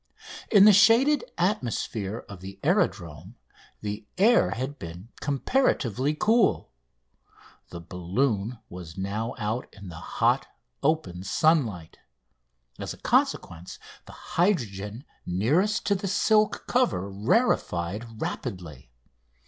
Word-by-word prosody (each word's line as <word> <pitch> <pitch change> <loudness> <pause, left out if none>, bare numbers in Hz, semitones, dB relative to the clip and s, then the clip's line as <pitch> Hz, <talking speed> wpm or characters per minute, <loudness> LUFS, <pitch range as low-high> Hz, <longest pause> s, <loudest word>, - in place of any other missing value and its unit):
In 205 -2 +7
the 210 - +8
shaded 230 +8 +5
atmosphere 120 - -2
of 100 -3 -10
the 95 +1 -9
aerodrome 95 - -1 0.5
the 105 0 -5
air 225 +5 +5
had 130 +5 -4
been 85 +6 -9
comparatively 140 - 0
cool. 215 - +2 1.0
The 85 - -8
balloon 100 +6 -1
was 90 -1 -10
now 105 +4 -3
out 110 +1 -3
in 100 -2 -11
the 85 -1 -9 0.2
hot, - - +2 0.3
open 140 - 0
sunlight. 105 - 0 0.8
As - - -5
a - - -20
consequence, 85 +2 -1 0.3
the - - -11 0.2
hydrogen 115 - 0 0.2
nearest 150 - +1
to 205 - +3
the 195 0 -2
silk 215 +2 +2
cover 245 - +1
rarefied 105 - 0
rapidly. 80 -10 -6
115 Hz, 110 wpm, -26 LUFS, -, 1.0 s, the